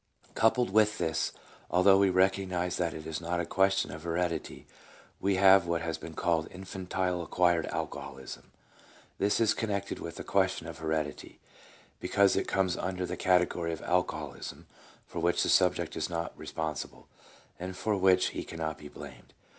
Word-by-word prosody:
Coupled 115 -1 +2
with 110 +1 +4
this, 80 -2 0 0.4
although 95 +2 +5
we 100 -1 +4
recognize 95 -1 +1
that 85 -3 -1
it 80 0 -8
is 80 0 -4
not 85 +1 -1
a 85 - -1
question 95 +2 +2
of 75 - -8
heredity, 85 -1 -2 0.5
we 100 0 +1
have 95 -1 +6
what 85 -1 0
has 80 -1 -3
been 80 -1 -9
called 85 -2 +1
" - - -23
Infantile 95 -1 -3
acquired 85 0 +2
alcoholism." 70 -4 -6 0.7
This 100 +1 +2
is 110 -2 +4
connected 100 -3 -3
with 85 0 -6
the - - -6
question 95 -3 +1
of 80 0 -8
heredity, 80 -2 -3 0.6
because 100 -1 +3
it - - 0
comes 95 -2 +1
under 90 0 -2
the - - -4
category 90 -2 +2
of 80 - -7
alcoholism 80 -4 -2 0.4
for 85 - -6
which 85 +1 +2
the - - 0
subject - - +3
is - - -2
not 85 -1 -3
responsible, 80 -2 -5 0.5
and 90 +1 -6
for 110 +1 0
which 95 -1 +4
he - - -5
cannot 80 -2 -5
be 75 - -9
blamed. - - -12
90 Hz, 165 wpm, -30 LUFS, 80-95 Hz, 0.7 s, have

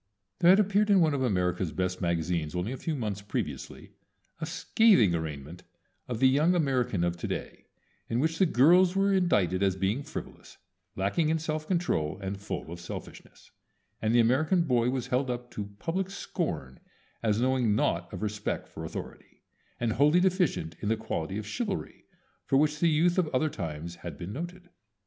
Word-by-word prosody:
There 175 - +5
had 190 +3 +7
appeared 205 +1 +2
in 200 -2 +6
one 160 -4 +3
of 140 - -1
America's 90 -7 0
best 90 +2 -2
magazines 85 -2 -1
only 90 +6 -2
a 130 - -4
few 160 +4 -3
months 105 -6 -3
previously 100 - -5 0.5
a 160 - -3
scathing 170 - +4
arraignment 80 0 -5 0.5
of 125 - -3
the 130 - +6
young 150 +7 +3
American 125 - +1
of 85 0 0
To - - -4
day, - - -5 0.4
in 115 - 0
which 160 +3 0
the 190 - +5
girls 175 +7 +5
were 195 0 +3
indicted 100 - +2
as 95 -2 +2
being 95 +7 0
frivolous, - - -9 0.4
lacking 100 - +1
in 160 - +2
self 155 -1 -3
control, 170 - 0
and 95 0 -4
full 85 - -5
of 85 - -7
selfishness, 85 - -10 0.5
and 110 - +1
the - - +6
American 155 +10 +3
boy 125 -5 +2
was 130 -2 -2
held 125 +1 0
up 120 0 -4
to 100 -1 -6
public 185 - -2
scorn 85 - -4 0.4
as 110 -1 +1
knowing 125 -4 +2
naught 85 -4 0
of - - -6
respect 105 -1 -3
for - - -9
authority, - - -8 0.4
and 115 -2 0
wholly 150 +8 +4
deficient 180 - +1
in 105 - -2
the 115 - +2
quality 95 -4 -3
of 105 - -5
chivalry 200 - -4 0.4
for 135 - +3
which 150 +1 +2
the 170 - +4
youth 170 +4 +3
of 175 - +2
other 155 +5 +2
times 85 - -6
had 85 -4 -8
been 90 +4 -6
noted. 175 +4 -7
125 Hz, 180 wpm, -28 LUFS, -, 0.5 s, had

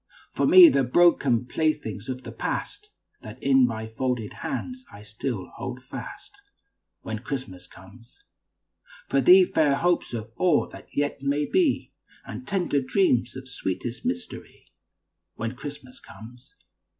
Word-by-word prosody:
For - - +1
me, 365 -2 +10
the 135 - +3
broken 130 -4 +3
playthings 130 - -2
of 130 0 -5
the - - -8
past 415 +1 -5 0.3
That 110 +2 -10
in 135 -2 +5
my 110 -1 -4
folded 115 0 -3
hands 255 0 -5
I 105 - -12
still 105 -1 -5
hold - - -6
fast, - - -9 0.7
When 110 -1 -4
Christmas 110 -8 -6
comes. 100 +5 -17 0.9
For 135 - +2
thee, 185 +8 +7
fair 150 -5 +2
hopes 175 0 0
of 110 0 -6
all 175 -5 +2
that - - -13
yet 145 -1 -2
may 140 +2 0
be, 345 - +1 0.3
And - - -8
tender 180 -8 0
dreams 130 - +1
of 130 0 -8
sweetest 120 0 -5
mystery, 245 -2 -6 0.7
When 115 +3 -4
Christmas 140 -2 -10
comes. 120 +5 -14
130 Hz, 140 wpm, -25 LUFS, 115-160 Hz, 0.9 s, me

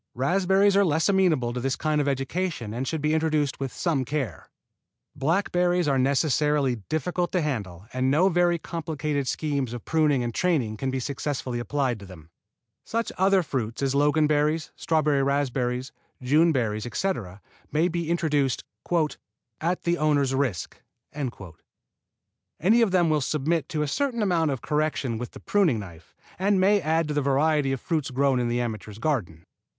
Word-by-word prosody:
Raspberries 190 +8 +3
are 200 - +5
less 160 0 +2
amenable 165 -11 +2
to 125 - -3
this 130 +1 -1
kind 155 -1 0
of 145 - -1
education 135 - -2
and 130 +3 -3
should 160 -2 -2
be 155 +1 +2
introduced 155 -3 0
with 135 -2 -3
some 155 -3 0
care. 130 - -4 0.7
Blackberries 175 +3 +1
are 135 -2 +2
necessarily 140 -1 +2
difficult 175 +3 -1
to 180 - +2
handle 100 - -4
and 130 +1 +1
no 155 +7 +4
very 175 -1 +2
complicated 155 -4 -3
schemes 140 -4 -1
of 120 - -7
pruning 150 -5 +2
and 120 -1 -3
training 140 -12 0
can 135 +4 -2
be 130 0 -1
successfully 130 -2 -3
applied 130 -2 -1
to 100 - -11
them. 85 -3 -14 0.5
Such 230 +1 -2
other 190 0 +3
fruits 125 -4 -3
as 135 -1 +1
Loganberries, 150 +2 +2
strawberry 150 -3 +1
raspberries, 130 -2 -1 0.3
June 150 +6 +3
berries, 110 -5 -1
etc., 120 - -3 0.3
may 160 +3 +2
be 170 -2 -3
introduced 150 -6 +1 1.0
"at 175 +3 -1
the 170 0 0
owner's 145 -3 +2
risk." 130 - -2 1.8
Any 220 +8 +4
of 230 - +4
them 175 -3 +3
will 150 -1 +2
submit 155 +2 -1
to 150 -1 -1
a - - -2
certain 235 - -1
amount 170 -5 +2
of 135 -4 -3
correction 150 -6 -1
with 125 - -6
the - - -10
pruning 185 - +2
knife, 85 -6 -10 0.2
and 195 +1 +2
may 200 +2 +4
add 160 0 +1
to - - -1
the 145 - +1
variety 140 +1 +2
of 135 - -2
fruits 155 -1 -2
grown 135 0 +2
in 120 - 0
the 120 +1 0
amateur's 110 -3 -5
garden. 110 - -2
145 Hz, 165 wpm, -25 LUFS, 130-165 Hz, 1.8 s, are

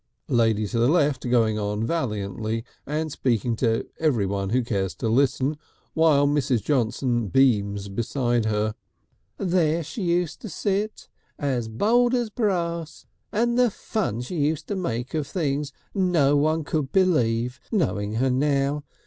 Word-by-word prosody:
Lady 110 -3 +2
to 115 +3 -2
the 120 - +4
left 145 -5 +2
going 110 -3 +2
on 105 +1 -1
valiantly 110 - -2 0.2
and 155 +2 -2
speaking 120 -4 0
to 115 -1 0
everyone 100 -10 0
who 125 +4 +1
cares 95 -6 -2
to 110 - -3
listen, 135 +4 +1 0.3
while 155 -3 +4
Mrs. 135 -6 +1
Johnson 120 -3 0
beams 100 -4 +2
beside 120 +3 -1
her: 110 0 0 0.6
"There 170 -3 +1
she 205 - -6
used 175 -2 0
to 220 - -6
sit 205 +2 -2 0.3
as 130 -6 -1
bold 240 - +2
as 240 -3 -1
brass, 170 -7 -2 0.3
and 235 +3 +1
the 250 -1 +5
fun 195 - -3
she 165 +8 -5
used 150 +1 0
to 205 - -1
make 125 -9 -3
of 155 -3 -1
things 145 -3 -2 0.2
no 170 -7 +3
one 155 +2 +2
could 145 -2 -2
believe 125 -10 +2
knowing 105 - 0
her 130 +4 +1
now. 140 +2 +1
135 Hz, 145 wpm, -24 LUFS, 115-165 Hz, 0.6 s, the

